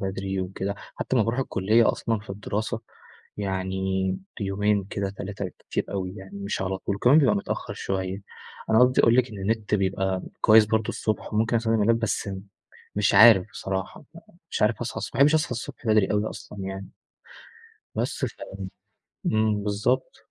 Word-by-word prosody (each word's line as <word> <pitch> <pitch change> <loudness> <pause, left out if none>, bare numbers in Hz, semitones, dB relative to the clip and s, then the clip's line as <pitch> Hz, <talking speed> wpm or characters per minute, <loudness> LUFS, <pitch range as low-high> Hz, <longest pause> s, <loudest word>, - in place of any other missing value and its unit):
بدري 95 0 -2
وكده، 95 +2 -3 0.2
حتى 130 - -1
لمّا 110 - +4
باروح 120 +3 0
الكلية 110 0 +3
أصلًا 115 -2 -1
في 110 - -12
الدراسة 105 +3 -3 0.6
يعني 95 -1 -1 0.2
يومين 100 0 +1
كده 100 0 -3
3 100 +1 -6
بالكتير 90 - -4
أوي 95 -2 -3
يعني 95 0 -9
مش 100 -1 -3
على 95 0 -2
طول 100 - -3
كمان 130 +8 +6
بيبقى 125 -8 +4
متأخر 100 - -4
شوية. 95 +1 -3 0.5
أنا 110 - +5
قصدي 125 0 +5
أقول 115 - +5
لِك 125 0 +3
إن 105 - -8
النت 105 +2 -1
بيبقى 95 -1 0 0.2
كويس 110 0 +7
برضه 110 0 0
الصبح 110 0 -2
وممكن 115 +2 +2
أستخدم 115 -1 +1
اللاب 115 +2 +3
بس 115 -2 -1 0.7
مش 105 -1 +2
عارف 110 -4 +8
بصراحة، 95 -3 -4 0.5
مش - - -1
عارف - - +2
أصحى - - -3
الصبح - - -6
ما - - -4
باحبش 145 +3 +6
أصحى 155 - +1
الصبح 120 0 -7
بدري 110 -3 +3
أوي 105 +1 0
أصلًا 105 - -10
يعني. 95 0 -5 1.1
بس - - -1
ف - - -4 0.9
إمم، 110 -1 +2
بالضبط. 110 +6 0
105 Hz, 165 wpm, -25 LUFS, 95-110 Hz, 1.1 s, عارف